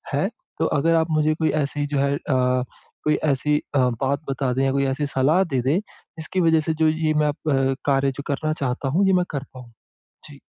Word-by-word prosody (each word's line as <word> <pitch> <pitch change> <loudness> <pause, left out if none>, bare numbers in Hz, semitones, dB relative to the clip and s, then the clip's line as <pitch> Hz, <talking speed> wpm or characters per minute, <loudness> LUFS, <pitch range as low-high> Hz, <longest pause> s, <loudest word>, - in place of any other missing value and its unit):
हैं। 170 +8 +1 0.3
तो 160 - +2
अगर 165 +4 +2
आप 160 0 +2
मुझे 155 0 +2
कोई 160 0 0
ऐसी 145 +1 -2
जो 145 -1 -1
है 140 0 +1
अ, - - -2
कोई 130 +3 -1 0.2
ऐसी 150 +2 +1 0.2
अ, 140 - +4
बात 130 +3 0
बता 135 -2 -1
दें 135 - 0
या 135 - +2
कोई 140 0 +1
ऐसी 145 +2 -2
सलाह 145 +7 +2
दे 125 - +2
दें, 135 +7 +1
जिसकी 185 -3 -6
वजह 160 -2 +4
से 160 +1 -1
जो 160 - +5
ये 155 0 0
मैं 150 0 +2
अब 135 -3 0
कार्य, 135 -1 +2
जो 140 +2 -8
करना 155 +2 -1
चाहता 135 -2 -2
हूँ, 180 +9 +2
ये 190 - +4
मैं 180 -1 +3
कर 140 -2 -2
पाऊँ। 125 -2 -11 0.6
जी। - - -13
145 Hz, 220 wpm, -23 LUFS, 135-155 Hz, 0.6 s, जो